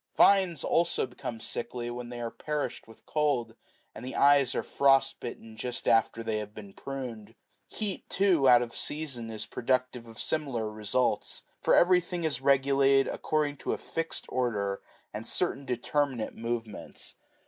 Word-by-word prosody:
Vines 190 -4 +5
also 170 -4 +2
become 120 -2 -7
sickly 120 +1 -4
when 120 0 -6
they 120 0 -6
are 115 -1 -3
perished 150 -5 -4
with 115 - -17
cold, 140 -7 0 0.4
and 115 - -9
the 130 - -6
eyes 140 -2 +5
are - - 0
frost 135 -1 +3
bitten 115 -2 -8
just 125 +2 -4
after 115 0 +3
they 110 -1 -1
have 105 0 -7
been 100 -2 -10
pruned. 120 -5 -7 0.3
Heat, 205 -4 -4
too, 180 -9 +4
out 120 -1 +7
of 115 -1 -8
season, 140 -7 -3
is 110 -1 -5
productive 125 -1 -1
of 115 -1 -12
similar 125 -8 -1
results: 110 +4 0 0.2
for - - +4
everything 180 -1 +3
is 150 -5 0
regulated 135 0 +4
according 150 -2 -1
to - - -2
a - - -2
fixed 165 0 -3
order 105 -6 -1 0.3
and 110 +2 -5
certain 140 -6 +1
determinate 125 -1 -1
movements. 115 -1 -5
125 Hz, 155 wpm, -29 LUFS, 115-145 Hz, 0.4 s, out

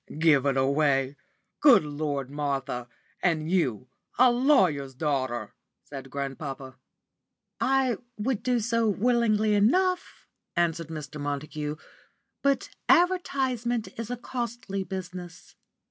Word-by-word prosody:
"Give 155 -4 +4
it 135 -1 +1
away! 135 0 +2 0.4
Good 275 - +7
Lord, 145 -2 -3
Martha 135 -4 -2 0.3
and 160 -2 +1
you 130 - 0 0.3
a 250 0 +6
lawyer's 185 - +2
daughter!" 130 -6 -2 0.3
said 135 -2 -9
grandpapa. 135 -1 -5 0.8
"I 265 -2 +2 0.2
would 225 +1 -1
do 250 -1 +1
so 230 0 +1
willingly 215 0 +2
enough," 360 - +1 0.3
answered 170 -1 0
Mr. 150 -2 -7
Montague, 150 +1 -3 0.7
"but 275 -1 +1 0.2
advertisement 265 -10 +2
is 230 -1 -4
a 245 - -3
costly 235 -5 -4
business. 180 -2 -8
175 Hz, 105 wpm, -27 LUFS, -, 0.8 s, Good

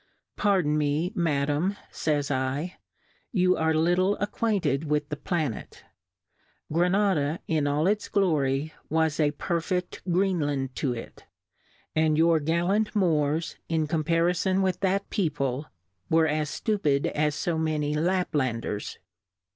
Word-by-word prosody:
103 - - -6
Pardon 180 -8 +3
me, 150 +4 0
Madam, 150 +3 0 0.2
fays 145 -2 0
7, 135 +5 -1 0.6
you 185 -4 +3
are 160 0 +1
little 175 +5 +2
acquainted 200 -9 0
with 150 -1 0
the 150 - -2
Planet; 150 - -3 0.9
Gra 175 +2 +3
nada 180 -6 +1
in 155 -3 +1
all 145 +2 +1
its 210 +2 0
Glory, 155 -6 +1 0.2
was 160 -1 +1
a 150 -2 +4
perfect 175 +4 -2
Greenland 150 -8 0
to 135 - 0
it; 115 - -9 0.7
and 155 -1 +3
your 165 0 +4
gallant 175 +8 0
Moorsy 160 -4 +1
in 160 -2 +1
compariibn 170 +4 +1
with 185 -1 0
that 195 +1 0
Peo 185 -6 +1
ple, 140 -1 -2 0.4
were 160 0 +4
as 150 -1 0
ftupid 150 -11 0
as 150 -1 -1
fo 165 -2 0
many 155 -2 0
La£}a?i* 150 -7 0
ders. 105 -2 -5
160 Hz, 130 wpm, -27 LUFS, 145-180 Hz, 0.9 s, a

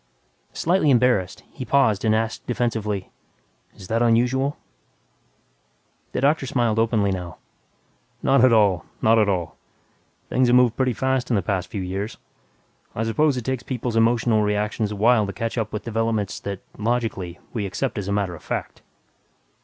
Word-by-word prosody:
Slightly 170 -2 +2
embarrassed, 120 -8 +2
he 130 - -7
paused 125 -5 +2
and 110 -1 +3
asked 110 0 -2
defensively, 110 -5 -2 0.6
"Is 95 - -11
that 115 +3 0
unusual?" 125 +4 +2 1.6
The - - -1
doctor 140 0 +2
smiled 120 -3 +1
openly 110 -3 +2
now, 90 -2 -5 0.9
"Not 135 -2 +4
at 130 - +6
all, 100 -7 +3 0.2
not 115 +1 +4
at 105 -1 +3
all. 85 -6 -2 0.7
Things 130 0 +2
have 120 - +4
moved 125 -2 +4
pretty 130 -2 +1
fast 130 +1 -1
in 120 - +2
the 100 - +1
past 95 0 -1
few 100 -5 -4
years. 95 +4 -4 0.8
I 110 - -1
suppose 135 +5 +1
it 120 - -4
takes 130 -2 -2
people's 120 -2 -4
emotional 115 -1 +3
reactions 105 +1 -1
a - - -4
while 110 0 +3
to 100 - -5
catch 115 +5 -3
up 110 -3 -2
with 105 - -4
developments 115 -3 -1
that, 100 -1 -5 0.2
logically, 110 -6 -2 0.2
we 105 -5 -2
accept 105 +4 -3
as 100 0 -4
matter 100 -3 -1
of 85 - -10
fact." - - -5
115 Hz, 160 wpm, -23 LUFS, 100-125 Hz, 1.6 s, at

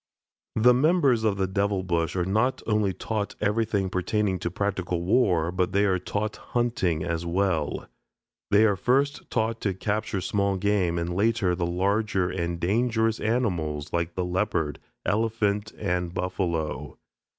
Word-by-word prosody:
The 125 +3 +6
members 140 -4 +3
of 105 -3 +1
the 95 - +1
"Devil 100 0 0
Bush" 85 -2 -1
are 90 -1 0
not 110 +7 +1
only 105 -3 +1
taught 105 +3 -3
everything 105 -2 +1
pertaining 95 +1 0
to 85 - -2
practical 90 -2 -2
war, 90 -5 +2
but 90 0 -1
they 100 +1 +3
are 95 -2 +2
taught 105 +4 -3
hunting 105 -10 -1
as 85 0 -2
well. 85 -4 0 0.6
They 105 +2 +5
are 105 -2 +3
first 135 +8 0
taught 115 0 -1
to 100 -3 -1
capture 105 +1 -2
small 100 +1 0
game 95 -3 +1
and 85 +1 -2
later 105 -2 +2
the 85 -1 -1
larger 95 +1 0
and 85 -2 -2
dangerous 110 +4 +1
animals 85 -11 -1
like 85 0 -1
the 90 - -1
leopard, 90 -5 -1 0.3
elephant, 105 0 0
and 90 -3 -1
buffalo. 85 -4 -3
100 Hz, 150 wpm, -26 LUFS, 90-110 Hz, 0.6 s, The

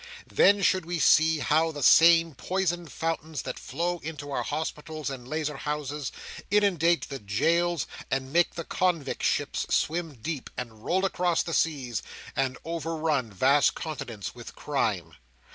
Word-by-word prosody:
Then 200 0 +5
should 185 0 +3
we 175 0 -2
see 160 0 +5
how 155 +3 +2
the 145 -3 -5
same 165 +3 +7
poisoned 175 +1 -2
fountains 160 -3 -3
that 130 - -5
flow 175 +5 -2
into 145 -2 -7
our - - -1
hospitals 155 -1 -4
and 125 -2 -8
lazar 150 0 -2
houses, 150 -1 -3 0.4
inundate 180 -5 +3
the 135 -1 -6
jails, 165 - +1 0.2
and 135 +1 -2
make 175 0 +3
the 165 - -4
convict 170 -7 -1
ships - - 0
swim 165 -2 0
deep, 145 +4 -5
and 110 -3 -7
roll 190 +6 +1
across 180 -3 +1
the 165 - -5
seas, 135 -8 0 0.3
and 130 -1 0
over 165 0 -3
run 155 -7 0
vast 135 +9 +3
continents 120 - -5
with - - -11
crime. - - -2
160 Hz, 150 wpm, -27 LUFS, 140-170 Hz, 0.4 s, same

